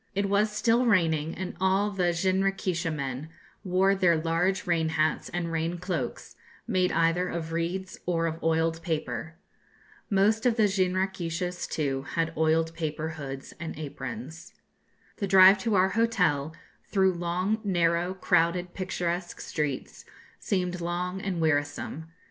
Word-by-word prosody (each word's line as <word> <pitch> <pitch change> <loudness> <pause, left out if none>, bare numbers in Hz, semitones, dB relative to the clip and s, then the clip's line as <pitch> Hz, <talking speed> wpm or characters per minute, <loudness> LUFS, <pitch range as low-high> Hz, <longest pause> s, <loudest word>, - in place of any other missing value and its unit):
It 200 0 +1
was 205 +2 +2
still 235 +3 +2
raining, 165 -7 +2
and 185 -1 -5
all 190 +2 +2
the 180 -3 +1
jinrikisha 185 -1 0
men 140 0 -4 0.3
wore 190 +1 +3
their 180 -4 +3
large 170 +4 0
rain 165 -2 +1
hats 155 -1 0
and 170 -1 -3
rain 165 +2 -1
cloaks, 170 -8 -4 0.3
made 185 -1 +2
either 165 +2 +2
of 165 -1 -4
reeds 175 +3 -3
or 165 -2 +1
of 165 0 -3
oiled 165 0 +1
paper. 160 0 -3 0.7
Most 215 +4 +3
of 235 - +2
the 220 - +4
jinrikishas, 180 -2 -1
too, 135 -3 -1
had 165 -1 0
oiled 160 +1 +2
paper 160 -1 -3
hoods 135 -4 -7
and 160 -2 -6
aprons. 135 0 -7 0.6
The 200 - -2
drive 190 +1 +8
to 220 +1 0
our 190 0 +4
hotel, 180 -9 +1 0.3
through 190 -2 +3
long, 180 +5 -1
narrow, 175 -1 +1
crowded, 175 0 +1
picturesque 180 -2 -3
streets, 150 -4 -4 0.4
seemed 180 -2 -1
long 180 +2 -2
and 190 -3 -2
wearisome. 155 0 -1
175 Hz, 135 wpm, -27 LUFS, 160-190 Hz, 0.7 s, drive